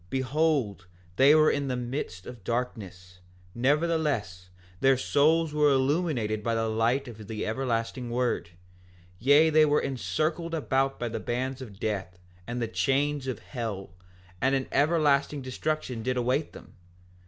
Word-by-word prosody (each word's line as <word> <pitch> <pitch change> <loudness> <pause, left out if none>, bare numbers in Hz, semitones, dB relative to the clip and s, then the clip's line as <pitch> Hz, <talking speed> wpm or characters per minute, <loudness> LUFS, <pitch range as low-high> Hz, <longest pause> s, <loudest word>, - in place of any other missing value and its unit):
Behold, 130 - 0 0.3
they 140 +6 +6
were 155 0 +5
in 140 -1 -1
the 130 - -1
midst 120 -8 -5
of 120 -5 -10
darkness; 95 -7 -4 0.3
nevertheless, 140 - 0 0.3
their 135 +2 +4
souls 155 +4 +2
were 150 -1 +4
illuminated 135 -6 +1
by 115 +1 -1
the 115 0 0
light 115 +5 +1
of 110 -3 -10
the 110 -2 -4
everlasting 120 +1 -2
word; 120 -7 -1 0.7
yea, 145 +6 +5
they 155 0 +6
were 150 -1 +3
encircled 155 +5 -2
about 135 -3 0
by 120 - -2
the 115 - -4
bands 130 +2 -3
of 105 -6 -10
death, 95 -5 -3 0.3
and 120 +1 -3
the 115 - -1
chains 140 +4 0
of 130 - -2
hell, 110 -8 -6 0.5
and 135 +1 +3
an 135 -1 -1
everlasting 145 -2 +2
destruction 130 -2 -3
did 125 +2 -1
await 130 +5 0
them. - - -13
130 Hz, 145 wpm, -27 LUFS, 115-145 Hz, 0.7 s, they